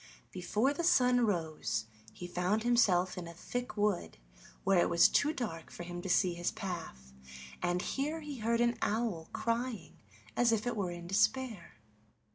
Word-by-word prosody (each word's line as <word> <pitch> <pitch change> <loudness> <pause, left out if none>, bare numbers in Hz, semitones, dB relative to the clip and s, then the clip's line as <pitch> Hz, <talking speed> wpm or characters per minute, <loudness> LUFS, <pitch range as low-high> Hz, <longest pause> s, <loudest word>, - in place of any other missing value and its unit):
Before 210 +9 0
the 340 - -3
sun 250 -7 +4
rose 155 - -1 0.3
he 180 - -9
found 180 +5 0
himself 190 -7 +3
in 170 - -7
a 170 - -9
thick 245 +6 -5
wood 205 - 0 0.5
where 195 -2 +4
it - - +3
was 170 0 +6
too 290 - +2
dark 210 - -5
for 175 - -8
him 175 0 -6
to 190 - -5
see 180 0 +3
his 175 0 -1
path, 160 - -6 0.5
and 175 0 0
here 300 +4 -2
he 290 -4 -7
heard 230 +2 +1
an 240 0 +2
owl 210 -7 -1
crying 230 -7 -3 0.4
as 240 -1 +4
if 225 -1 +1
it 245 - -1
were 195 -4 -1
in 175 0 -7
despair. 215 - 0
200 Hz, 170 wpm, -32 LUFS, 175-240 Hz, 0.5 s, was